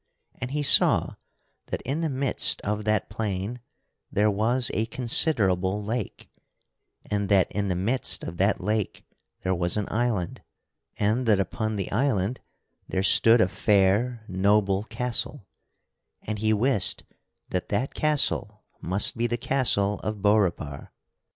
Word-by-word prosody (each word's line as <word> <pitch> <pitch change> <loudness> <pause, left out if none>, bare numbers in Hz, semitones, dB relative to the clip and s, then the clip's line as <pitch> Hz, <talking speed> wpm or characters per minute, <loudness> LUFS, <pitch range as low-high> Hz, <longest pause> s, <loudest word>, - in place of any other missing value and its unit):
And 125 - -6
he 145 +2 -2
saw - - +5 0.5
that - - -4
in 145 +5 -2
the 165 - 0
midst 135 0 +1
of 105 +1 -3
that 105 -2 +1
plain 105 +2 -4 0.5
there 105 +1 +2
was 115 +5 0
a 110 +1 0
considerable 105 - +2
lake, 115 0 -4 0.8
and 100 -1 -2
that 95 -3 +3
in 100 0 -2
the 90 - -1
midst 115 +9 -1
of 85 - -6
that 100 +3 +2
lake 105 +2 -2 0.4
there 95 - 0
was 90 +2 -1
an 105 - -2
island, 110 -7 -1 0.6
and 110 +4 0
that 105 -3 +4
upon 110 +2 -2
the 100 -2 -4
island 120 -1 0 0.5
there 95 - -1
stood 115 +4 +5
a - - +4
fair 105 +5 +1
noble 100 +1 +1
castle, 120 +2 -3 0.8
and 105 -1 -4
he 110 +1 +1
wist 105 -3 +2 0.5
that 90 - -3
that 115 +7 -1
castle 135 -8 0 0.2
must 95 +4 0
be 120 +1 0
the 120 0 -2
castle 110 -6 +1
of 110 -1 -4
Beaurepaire. 95 -9 0
105 Hz, 140 wpm, -25 LUFS, 100-120 Hz, 0.8 s, saw